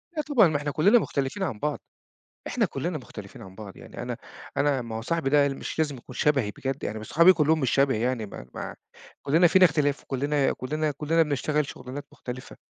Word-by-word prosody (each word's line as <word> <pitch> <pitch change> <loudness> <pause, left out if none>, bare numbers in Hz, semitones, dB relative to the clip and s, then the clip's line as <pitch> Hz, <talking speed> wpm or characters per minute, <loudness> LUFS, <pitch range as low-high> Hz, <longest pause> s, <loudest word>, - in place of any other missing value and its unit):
لأ 305 - 0
طبعًا، 280 - +4
ما 155 -2 0
إحنا 145 0 -3
كُلّنا 195 +11 +5
مختلفين 140 +1 -2
عن 110 - -3
بعض، 150 -1 -2 0.7
إحنا - - +1
كُلّنا - - -3
مختلفين - - -11
عن 95 -1 -12
بعض. 100 -1 -10
يعني - - -9
أنا - - -4 0.4
أنا 140 -3 +2
ما 115 -1 -6
هو - - -3
صاحبي 135 +3 -1
ده 145 -1 +5
مش 135 +3 -6
لازم 150 -4 0
يكون 125 +1 -12
شبهي 135 -6 +2
بجد، 135 +5 -4
يعني 110 - -3
ما 110 - -8
صحابي 170 - +6
كُلّهم 160 -2 +2
مش 130 -4 +1
شبهي 135 -5 +2
يعني 120 -2 -1
ما 80 -11 -10
ما - - -5 0.5
كُلّنا 165 +5 +4
فينا 185 +2 +6
اختلاف 145 -3 +2
وكُلّنا 140 +1 0
كُلّنا 155 +4 -2
كُلّنا 150 +3 +1
بنشتغل 150 0 0
شُغلانات 130 +2 -8
مختلفة 125 0 -8
145 Hz, 205 wpm, -26 LUFS, 130-155 Hz, 0.7 s, صحابي